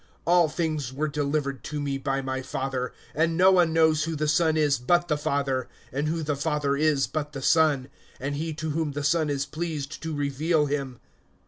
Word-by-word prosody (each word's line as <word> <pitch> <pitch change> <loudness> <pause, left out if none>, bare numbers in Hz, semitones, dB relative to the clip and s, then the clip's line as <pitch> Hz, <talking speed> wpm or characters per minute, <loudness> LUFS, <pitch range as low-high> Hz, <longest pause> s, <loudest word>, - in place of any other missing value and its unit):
(22)All 170 -2 +4
things 155 -5 -2
were 145 +4 -1
delivered 140 -2 -2
to 150 - -4
me 140 -1 -2
by 135 0 -2
my 130 0 -2
Father; 130 -1 -3 0.2
and 165 +3 +1
no 185 +1 +6
one 175 -3 +4
knows 160 -1 +3
who 165 -1 -3
the 155 0 -1
Son 160 +1 +3
is 145 -4 +2
but 175 +8 +2
the 150 - +1
Father, 140 -3 -1 0.2
and 140 +3 -1
who 165 +1 -1
the 150 -1 -1
Father 145 -1 0
is 145 -2 +2
but 150 -1 -4
the 135 - -5
Son, 150 -5 +3 0.3
and 140 +2 -3
he 160 +3 -3
to 155 0 -4
whom 155 -1 -1
the 145 0 -3
Son 155 +1 +2
is 140 -1 -1
pleased 155 -2 -5
to 160 - -4
reveal 150 +2 +1
him. 140 -4 -3
150 Hz, 205 wpm, -26 LUFS, 140-160 Hz, 0.3 s, no